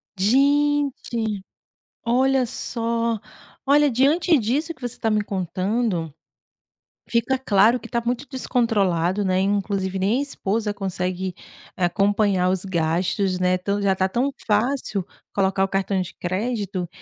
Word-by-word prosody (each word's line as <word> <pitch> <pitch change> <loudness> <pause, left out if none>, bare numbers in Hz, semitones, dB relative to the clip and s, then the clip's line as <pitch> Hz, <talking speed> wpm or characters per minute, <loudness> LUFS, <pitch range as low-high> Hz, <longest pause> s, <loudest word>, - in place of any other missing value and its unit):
Gente, 265 -2 +1 0.6
olha 260 +2 +3
só, 230 -1 -2 0.5
olha 290 +1 +5
diante 295 +7 +3
disso 280 +9 -1
que 255 - -27
você 245 -1 -3
está 225 - -1
me 210 -1 +1
contando. 185 -2 -1 1.0
Fica 235 +3 +1
claro 225 0 +4
que - - -10
está 235 - 0
muito 245 +4 -2
descontrolado, 205 -8 +1
né. 185 0 +2
Inclusive 195 -1 0
nem 205 +7 +2
a - - +1
esposa 215 -6 -2
consegue 185 -2 -3 0.4
acompanhar 195 +1 +2
os 190 0 -1
gastos, 180 +2 0
né. 185 0 +2
Tão 200 +2 -2
já 195 -1 +3
está 190 0 +1
tão 250 +7 0 0.2
fácil 215 -3 0 0.3
colocar 195 -1 +2
o - - -1
cartão 195 0 0
de 180 - -5
crédito 195 -1 -2
205 Hz, 130 wpm, -23 LUFS, 190-245 Hz, 1.0 s, olha